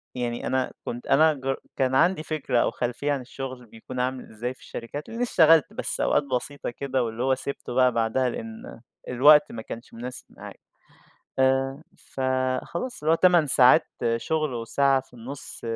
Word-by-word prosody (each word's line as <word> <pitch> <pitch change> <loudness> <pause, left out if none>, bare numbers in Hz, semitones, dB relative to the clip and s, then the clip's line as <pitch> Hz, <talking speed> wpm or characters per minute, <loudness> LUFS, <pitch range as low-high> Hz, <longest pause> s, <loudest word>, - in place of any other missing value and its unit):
يعني 120 -1 -3
أنا 130 -1 0
كنت 120 +1 -6
أنا 155 +2 +5
جر 135 -1 -3 0.2
كان 130 -1 +1
عندي 170 +2 +3
فكرة 150 -6 -1
أو - - +1
خلفية 125 +4 -2
عن 140 -2 -1
الشغل 130 0 -7
بيكون 115 +3 -9
عامل 130 0 -2
إزاي 120 +4 -4
في - - -24
الشركات، 130 +6 -7
لإنّي 230 +2 -3
اشتغلت 165 - +4
بس 245 - -3
أوقات - - +2
بسيطة 140 +1 -3
كده 130 0 -2
واللي 115 +1 -3
هو 130 0 +3
سِبته 135 -1 -6
بقى 125 0 +4
بعدها 115 +3 +1
لإن 225 - -8 0.3
الوقت 145 +4 +6
ما 115 - -6
كانش 115 +2 -9
مناسب 125 +2 -7
معايا، - - -11 0.8
آآ، 135 +2 +1
فخلاص 130 - -3
اللي 155 - +3
هو - - +5
8 175 -3 +4
ساعات 130 +4 +5 0.3
شغل 155 +2 -1
وساعة 135 +3 +1
في 130 -1 -26
النُص 125 +4 -8
130 Hz, 170 wpm, -25 LUFS, 125-150 Hz, 0.8 s, الوقت